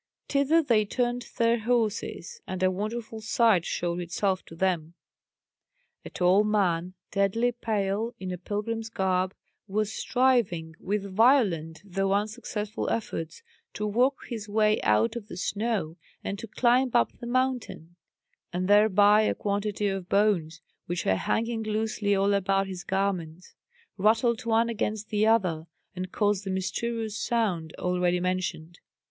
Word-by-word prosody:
Thither 285 Hz, +4 st, +3 dB
they 230 Hz, -6 st, +3 dB
turned 245 Hz, +3 st, -2 dB
their 230 Hz, 0 st, +3 dB
horses, 235 Hz, -, -1 dB
and 185 Hz, 0 st, -3 dB
a 185 Hz, -, +4 dB
wonderful 220 Hz, +3 st, -4 dB
sight 220 Hz, -5 st, +3 dB
showed 175 Hz, 0 st, -2 dB
itself 185 Hz, +2 st, -1 dB
to 165 Hz, -, -12 dB
them. 170 Hz, -2 st, -1 dB, 1.1 s
A -, -, -8 dB
tall 185 Hz, +3 st, +3 dB
man, 185 Hz, -4 st, 0 dB, 0.2 s
deadly 200 Hz, +5 st, +1 dB
pale, 220 Hz, -1 st, -2 dB
in 185 Hz, -1 st, -5 dB
a 180 Hz, -, -4 dB
pilgrim's 220 Hz, +4 st, -3 dB
garb, 185 Hz, -2 st, 0 dB, 0.3 s
was 215 Hz, +2 st, -1 dB
striving 230 Hz, -11 st, +1 dB
with 205 Hz, +1 st, -2 dB
violent 190 Hz, -, +2 dB
though 195 Hz, 0 st, 0 dB
unsuccessful 210 Hz, 0 st, -2 dB
efforts, 165 Hz, -, -4 dB, 0.3 s
to 210 Hz, -, -2 dB
work 245 Hz, +6 st, +2 dB
his 220 Hz, -4 st, -6 dB
way 215 Hz, 0 st, +2 dB
out 105 Hz, +2 st, +2 dB
of 225 Hz, -3 st, -6 dB
the 195 Hz, -, -8 dB
snow 200 Hz, -5 st, -2 dB, 0.3 s
and 200 Hz, -, -4 dB
to 230 Hz, -, -7 dB
climb 250 Hz, +4 st, +3 dB
up 115 Hz, -, +2 dB
the 240 Hz, -, -7 dB
mountain; 250 Hz, -9 st, -2 dB, 0.6 s
and 180 Hz, +1 st, -2 dB
thereby 205 Hz, 0 st, +6 dB
a 215 Hz, -, +1 dB
quantity 205 Hz, 0 st, -2 dB
of 195 Hz, -2 st, -3 dB
bones, 180 Hz, -6 st, +1 dB, 0.3 s
which 175 Hz, 0 st, -3 dB
were 95 Hz, -, +3 dB
hanging 225 Hz, -, -1 dB
loosely 215 Hz, -1 st, 0 dB
all 200 Hz, +1 st, +2 dB
about 195 Hz, 0 st, +1 dB
his 185 Hz, -2 st, -7 dB
garments, 185 Hz, -3 st, -2 dB, 0.5 s
rattled 225 Hz, +3 st, +2 dB
one 230 Hz, +1 st, +3 dB
against 215 Hz, -1 st, -3 dB
the 215 Hz, 0 st, +2 dB
other, 180 Hz, -8 st, +2 dB, 0.3 s
and 185 Hz, 0 st, -5 dB
caused 205 Hz, -2 st, +1 dB
the 195 Hz, -, -5 dB
mysterious 220 Hz, +4 st, -2 dB
sound 195 Hz, -10 st, -1 dB
already 180 Hz, 0 st, +1 dB
mentioned. 180 Hz, -2 st, -3 dB
205 Hz, 140 wpm, -27 LUFS, 185-225 Hz, 1.1 s, thereby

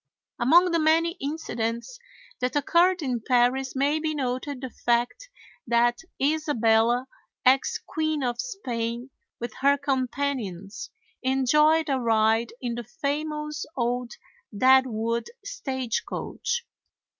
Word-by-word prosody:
Among 345 Hz, +9 st, +5 dB
the 335 Hz, -, +2 dB
many 325 Hz, +2 st, +3 dB
incidents 275 Hz, -, -3 dB, 0.4 s
that 250 Hz, +2 st, -1 dB
occurred 345 Hz, +4 st, +3 dB
in 250 Hz, -4 st, -1 dB
Paris 250 Hz, +3 st, +2 dB
may 285 Hz, +3 st, +1 dB
be 310 Hz, 0 st, -2 dB
noted 260 Hz, 0 st, -3 dB
the 260 Hz, -2 st, -5 dB
fact 245 Hz, -, -1 dB, 0.4 s
that 240 Hz, +1 st, +3 dB, 0.2 s
Isabella, 245 Hz, -5 st, +2 dB, 0.4 s
ex 260 Hz, +1 st, +4 dB
Queen 310 Hz, -3 st, -2 dB
of 245 Hz, -1 st, -1 dB
Spain, 245 Hz, -, -4 dB, 0.3 s
with 235 Hz, -2 st, -5 dB
her 280 Hz, +1 st, +4 dB
companions 260 Hz, -8 st, -3 dB, 0.3 s
enjoyed 300 Hz, +5 st, +3 dB
a 270 Hz, -2 st, +1 dB
ride 225 Hz, -1 st, +2 dB
in 240 Hz, -2 st, -3 dB
the 240 Hz, +1 st, -5 dB
famous 300 Hz, +4 st, -3 dB
old 245 Hz, 0 st, -1 dB, 0.4 s
Deadwood 235 Hz, -2 st, +3 dB, 0.2 s
stagecoach. 290 Hz, -, -3 dB
260 Hz, 110 wpm, -26 LUFS, 240-300 Hz, 0.4 s, Among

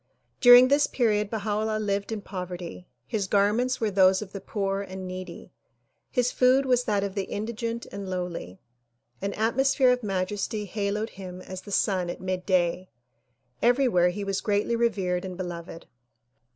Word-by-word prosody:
During 245 Hz, 0 st, +9 dB
this 285 Hz, +1 st, +4 dB
period 210 Hz, -4 st, +1 dB
Baha 215 Hz, -1 st, -3 dB
'Ullah 215 Hz, 0 st, -1 dB
lived 200 Hz, -1 st, -2 dB
in 220 Hz, -2 st, -3 dB
poverty. 180 Hz, -, -7 dB, 0.2 s
His 200 Hz, -, -2 dB
garments 210 Hz, +6 st, +2 dB
were 220 Hz, -2 st, 0 dB
those 190 Hz, -1 st, +5 dB
of 190 Hz, -, -13 dB
the 195 Hz, -, -7 dB
poor 195 Hz, -2 st, -2 dB
and 190 Hz, -1 st, -7 dB
needy 185 Hz, -1 st, -8 dB, 0.6 s
His 250 Hz, -2 st, +1 dB
food 260 Hz, +2 st, +4 dB
was 250 Hz, -1 st, +2 dB
that 205 Hz, -2 st, +1 dB
of 200 Hz, -1 st, -3 dB
the 195 Hz, -1 st, -2 dB
indigent 230 Hz, +3 st, -4 dB
and 200 Hz, -1 st, -6 dB
lowly. 180 Hz, -, -5 dB, 0.6 s
An 200 Hz, +1 st, -2 dB
atmosphere 255 Hz, +4 st, +3 dB
of 250 Hz, 0 st, +1 dB
majesty 205 Hz, +1 st, -2 dB
haloed 205 Hz, +2 st, -2 dB
him 185 Hz, -1 st, -9 dB
as 185 Hz, 0 st, -8 dB
the 205 Hz, -, -11 dB
sun 185 Hz, -3 st, +1 dB
at -, -, -5 dB
midday. 185 Hz, -1 st, 0 dB, 0.7 s
Everywhere 240 Hz, -8 st, +4 dB
he 200 Hz, +3 st, -4 dB
was 195 Hz, -1 st, -2 dB
greatly 210 Hz, +2 st, 0 dB
revered 195 Hz, -6 st, 0 dB
and 185 Hz, -2 st, -6 dB
beloved. 170 Hz, -2 st, -7 dB
200 Hz, 160 wpm, -26 LUFS, 185-225 Hz, 0.7 s, During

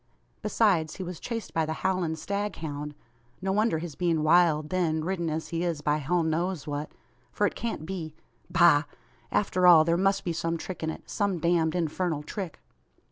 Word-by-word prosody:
Besides, 195 Hz, -7 st, +2 dB
he 190 Hz, -, -5 dB
was 180 Hz, -2 st, -6 dB
chased 230 Hz, -2 st, -5 dB
by 165 Hz, -, +2 dB
the 160 Hz, 0 st, -2 dB
howling 185 Hz, -4 st, +1 dB
staghound. 160 Hz, -7 st, -4 dB, 0.5 s
No 190 Hz, +1 st, -1 dB
wonder 210 Hz, -3 st, +2 dB
his 165 Hz, -1 st, -5 dB
being 165 Hz, -1 st, 0 dB
wild, 155 Hz, -2 st, +4 dB
then, 165 Hz, -4 st, +1 dB
ridden 175 Hz, -2 st, -1 dB
as 160 Hz, +1 st, -3 dB
he 165 Hz, 0 st, -2 dB
is 170 Hz, -4 st, -1 dB
by 150 Hz, 0 st, +1 dB
hell 165 Hz, +4 st, 0 dB
knows 165 Hz, 0 st, -1 dB
what; 145 Hz, 0 st, -4 dB, 0.4 s
for -, -, +1 dB
it -, -, 0 dB
can't 230 Hz, -9 st, -4 dB
be 165 Hz, -4 st, -5 dB, 0.3 s
Bah! 170 Hz, -4 st, +5 dB, 0.5 s
After 185 Hz, -3 st, +2 dB
all, 165 Hz, -3 st, +9 dB
there 170 Hz, +1 st, +2 dB
must 195 Hz, +2 st, +2 dB
be 170 Hz, -, -1 dB
some 165 Hz, 0 st, -1 dB
trick 180 Hz, +2 st, -7 dB
in 160 Hz, -, -1 dB
it; -, -, -7 dB
some 200 Hz, -3 st, 0 dB
damned 170 Hz, 0 st, +1 dB
infernal 165 Hz, -2 st, -1 dB
trick!" 185 Hz, 0 st, -6 dB
170 Hz, 185 wpm, -28 LUFS, 155-185 Hz, 0.5 s, all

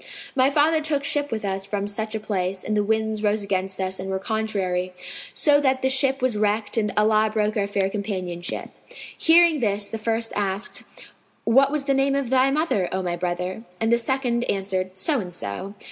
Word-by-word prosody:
My 260 Hz, 0 st, +4 dB
father 310 Hz, +2 st, +3 dB
took 300 Hz, -2 st, 0 dB
ship 290 Hz, 0 st, 0 dB
with 220 Hz, -2 st, -3 dB
us 195 Hz, 0 st, -2 dB
from 200 Hz, 0 st, -2 dB
such 215 Hz, +1 st, -3 dB
a -, -, -1 dB
place, 190 Hz, -3 st, -2 dB
and 215 Hz, -, -1 dB
the 210 Hz, -, +2 dB
winds 220 Hz, 0 st, 0 dB
rose 210 Hz, 0 st, +1 dB
against 190 Hz, -1 st, -2 dB
us 190 Hz, 0 st, -2 dB
and 190 Hz, +1 st, -5 dB
were 190 Hz, -, -1 dB
contrary, 190 Hz, -4 st, -2 dB, 0.4 s
so 290 Hz, -1 st, +4 dB
that 265 Hz, -2 st, +1 dB
the 265 Hz, -, +3 dB
ship 270 Hz, 0 st, +2 dB
was 255 Hz, -4 st, +2 dB
wrecked 210 Hz, +1 st, 0 dB
and 210 Hz, -3 st, +1 dB
Allah 215 Hz, 0 st, +4 dB
broke 215 Hz, -1 st, 0 dB
our 200 Hz, -2 st, 0 dB
fair 200 Hz, -1 st, 0 dB
companionship." 185 Hz, -4 st, -4 dB, 0.4 s
Hearing 330 Hz, -1 st, +5 dB
this 205 Hz, -3 st, 0 dB
the 225 Hz, -, -4 dB
first 225 Hz, +1 st, -1 dB
asked, 200 Hz, 0 st, -2 dB, 0.6 s
"What 270 Hz, +4 st, +4 dB
was 295 Hz, -2 st, -1 dB
the 275 Hz, -, +2 dB
name 270 Hz, +1 st, +2 dB
of 275 Hz, -3 st, -1 dB
thy 260 Hz, 0 st, +4 dB
mother, 275 Hz, -, 0 dB
O 190 Hz, 0 st, -2 dB
my 175 Hz, -1 st, -1 dB
brother?"; 180 Hz, +3 st, -3 dB, 0.2 s
and 225 Hz, +1 st, +1 dB
the 235 Hz, -, +4 dB
second 245 Hz, -1 st, 0 dB
answered, 190 Hz, -1 st, -2 dB
"So 285 Hz, +8 st, +1 dB
and 180 Hz, -4 st, -5 dB
so." 180 Hz, -, -5 dB
215 Hz, 200 wpm, -24 LUFS, 195-260 Hz, 0.6 s, Hearing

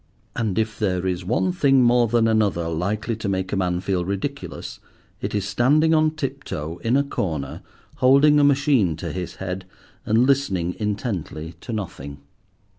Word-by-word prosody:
And 110 Hz, -4 st, -1 dB
if 110 Hz, -1 st, -1 dB
there 95 Hz, -4 st, 0 dB
is 90 Hz, -1 st, -1 dB
one 125 Hz, -, +1 dB
thing 135 Hz, -7 st, +4 dB
more 120 Hz, 0 st, +4 dB
than 115 Hz, 0 st, +2 dB
another 100 Hz, -7 st, +1 dB
likely 100 Hz, +8 st, -2 dB
to 110 Hz, -3 st, -3 dB
make 95 Hz, 0 st, -2 dB
a -, -, +2 dB
man 90 Hz, -2 st, 0 dB
feel 95 Hz, -2 st, -1 dB
ridiculous 100 Hz, +10 st, -5 dB, 0.4 s
it -, -, -3 dB
is 100 Hz, -1 st, -1 dB
standing 150 Hz, +9 st, +3 dB
on 155 Hz, 0 st, +3 dB
tip 135 Hz, -2 st, -4 dB
toe 80 Hz, +3 st, -5 dB
in 120 Hz, +4 st, +2 dB
a 140 Hz, -, +3 dB
corner, 80 Hz, -, -3 dB, 0.4 s
holding 140 Hz, +3 st, +5 dB
a -, -, +4 dB
machine 140 Hz, -, +3 dB
to 80 Hz, -, -5 dB
his 90 Hz, -2 st, -5 dB
head, 95 Hz, 0 st, -5 dB, 0.4 s
and 115 Hz, +3 st, +3 dB
listening 95 Hz, -11 st, +1 dB
intently 100 Hz, -7 st, -3 dB
to -, -, -7 dB
nothing. 85 Hz, -10 st, -5 dB
105 Hz, 170 wpm, -23 LUFS, 90-135 Hz, 0.4 s, holding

